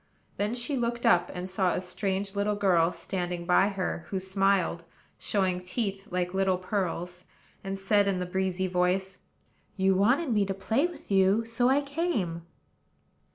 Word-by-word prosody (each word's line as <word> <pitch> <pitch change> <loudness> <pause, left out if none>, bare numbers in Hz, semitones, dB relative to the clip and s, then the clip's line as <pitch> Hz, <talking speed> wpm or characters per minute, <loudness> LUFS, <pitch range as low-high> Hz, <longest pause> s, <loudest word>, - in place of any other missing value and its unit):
Then 210 +3 -1
she 250 +4 -1
looked 235 0 -2
up, 175 0 +4
and 180 0 -5
saw 185 -1 +1
a - - 0
strange 195 +2 -3
little 205 +1 0
girl 180 -4 +3
standing 175 -2 -4
by 180 +2 +4
her, 190 -3 -3
who 195 - -2
smiled, 190 -2 +1 0.4
showing 185 -3 0
teeth 195 +1 -3
like 180 0 -2
little 190 -1 +2
pearls, 180 -2 -3 0.4
and 195 0 -4
said, 200 +1 +2
in 195 -2 +1
the 180 - -2
breezy 190 0 -1
voice: 185 +1 0 0.6
"You 190 0 +3
wanted 240 - +2
me 210 -2 +3
to 195 - -2
play 230 - +1
with 350 - -12
you, 195 +3 +3
so 235 +2 +1
I 275 +2 +3
came." 275 - -2
195 Hz, 160 wpm, -28 LUFS, 180-210 Hz, 0.6 s, up